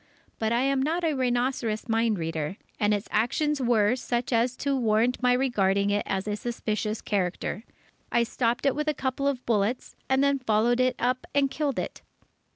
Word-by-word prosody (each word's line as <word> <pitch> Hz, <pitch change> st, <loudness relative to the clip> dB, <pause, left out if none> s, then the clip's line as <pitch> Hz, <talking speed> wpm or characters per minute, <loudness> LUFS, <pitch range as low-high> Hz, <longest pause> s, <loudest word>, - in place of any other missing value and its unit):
But 220 Hz, 0 st, 0 dB
I 235 Hz, +1 st, +2 dB
am 275 Hz, 0 st, +1 dB
not 325 Hz, +5 st, 0 dB
a 320 Hz, -2 st, +2 dB
rhinoceros 245 Hz, -4 st, -1 dB
mind 225 Hz, -2 st, +1 dB
reader, 160 Hz, +1 st, -3 dB, 0.2 s
and 210 Hz, 0 st, +2 dB
its 205 Hz, +1 st, -1 dB
actions 290 Hz, +6 st, +1 dB
were 235 Hz, -2 st, +3 dB
such 245 Hz, 0 st, -2 dB
as 235 Hz, +2 st, +1 dB
to 280 Hz, -1 st, 0 dB
warrant 235 Hz, 0 st, +1 dB
my 250 Hz, 0 st, +4 dB
regarding 200 Hz, -6 st, +2 dB
it 205 Hz, 0 st, +1 dB
as 190 Hz, +1 st, -2 dB
a 210 Hz, -, -1 dB
suspicious 215 Hz, -1 st, -3 dB
character. 190 Hz, +1 st, -2 dB, 0.5 s
I 235 Hz, -, +3 dB
stopped 240 Hz, +1 st, -1 dB
it 275 Hz, -, +4 dB
with 300 Hz, +1 st, -3 dB
a 305 Hz, -, +1 dB
couple 265 Hz, +1 st, -1 dB
of 270 Hz, -3 st, -2 dB
bullets, 225 Hz, +2 st, 0 dB
and 265 Hz, +1 st, +3 dB
then 280 Hz, -1 st, +2 dB
followed 240 Hz, 0 st, +2 dB
it 255 Hz, 0 st, +2 dB
up 250 Hz, +2 st, -1 dB
and 275 Hz, -1 st, +3 dB
killed 290 Hz, -4 st, -1 dB
it. -, -, -4 dB
240 Hz, 185 wpm, -27 LUFS, 215-265 Hz, 0.5 s, my